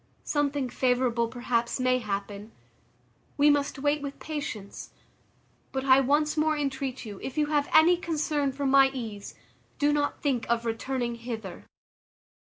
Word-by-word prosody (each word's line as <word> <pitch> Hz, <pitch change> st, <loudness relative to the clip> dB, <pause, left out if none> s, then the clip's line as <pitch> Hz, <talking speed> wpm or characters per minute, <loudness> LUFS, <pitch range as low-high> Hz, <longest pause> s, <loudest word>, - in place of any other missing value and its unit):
Something 290 Hz, -2 st, 0 dB
favourable 245 Hz, -2 st, +1 dB
perhaps 240 Hz, 0 st, -1 dB
may 255 Hz, 0 st, +2 dB
happen; 205 Hz, 0 st, -5 dB, 0.9 s
we 295 Hz, +1 st, +6 dB
must 285 Hz, 0 st, 0 dB
wait 290 Hz, +2 st, 0 dB
with 280 Hz, -1 st, -6 dB
patience; 280 Hz, -10 st, -6 dB, 0.8 s
but 265 Hz, 0 st, -3 dB
I 265 Hz, 0 st, +7 dB
once 295 Hz, +3 st, +2 dB
more 310 Hz, 0 st, +1 dB
entreat 270 Hz, -3 st, -3 dB
you, 205 Hz, -3 st, -8 dB
if 265 Hz, -, -6 dB
you 300 Hz, -, +3 dB
have 290 Hz, -1 st, +1 dB
any 335 Hz, +3 st, +6 dB
concern 305 Hz, -4 st, -1 dB
for 280 Hz, +1 st, -4 dB
my 270 Hz, 0 st, +6 dB
ease, 215 Hz, -5 st, -6 dB, 0.4 s
do 290 Hz, 0 st, +2 dB
not 290 Hz, -1 st, 0 dB
think 265 Hz, -5 st, 0 dB
of 235 Hz, 0 st, +1 dB
returning 240 Hz, +1 st, -2 dB
hither." 225 Hz, -6 st, -7 dB
265 Hz, 145 wpm, -27 LUFS, 235-290 Hz, 0.9 s, I